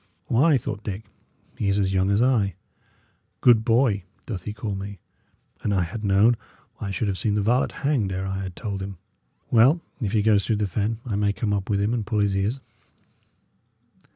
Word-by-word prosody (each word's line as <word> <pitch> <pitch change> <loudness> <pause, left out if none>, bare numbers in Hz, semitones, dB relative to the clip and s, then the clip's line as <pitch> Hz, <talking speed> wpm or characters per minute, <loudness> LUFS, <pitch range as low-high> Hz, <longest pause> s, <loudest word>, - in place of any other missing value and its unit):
"Why," 145 +5 +4
thought 110 -3 -5
Dick, 105 +1 -4 0.6
"he 105 - 0
is 100 0 +2
a 100 - +2
young 95 0 +1
as 100 +4 +3
I. 110 -8 +2 0.8
'Good 115 -3 +5
boy' 115 -3 +3 0.2
doth 95 -6 -5
he 105 - -3
call 105 0 -4
me? 100 +1 -6 0.6
An 105 - -1
I 95 -3 +2
had 100 +6 -6
known, 105 +4 +4 0.4
I 100 - -4
should 105 +3 -1
have 95 -2 -2
seen 105 -2 0
the 105 - +1
varlet 125 +5 +2
hanged 135 -9 0
ere 95 +1 -2
I 95 0 -3
had 95 -2 -6
told 100 -4 -4
him. 95 -1 -6 0.5
Well, 125 +8 +6 0.2
if 105 -4 -1
he 105 -2 +3
goes 105 -2 +4
through 110 - 0
the 105 0 0
fen, 105 +4 -1
I 110 -5 -2
may 100 0 +1
come 105 -1 -1
up 100 -2 -2
with 100 -2 +1
him 105 +3 +1
and 120 -3 -1
pull 110 +1 -2
his 100 -1 +2
ears." 105 +7 0
105 Hz, 205 wpm, -24 LUFS, 100-115 Hz, 0.8 s, Well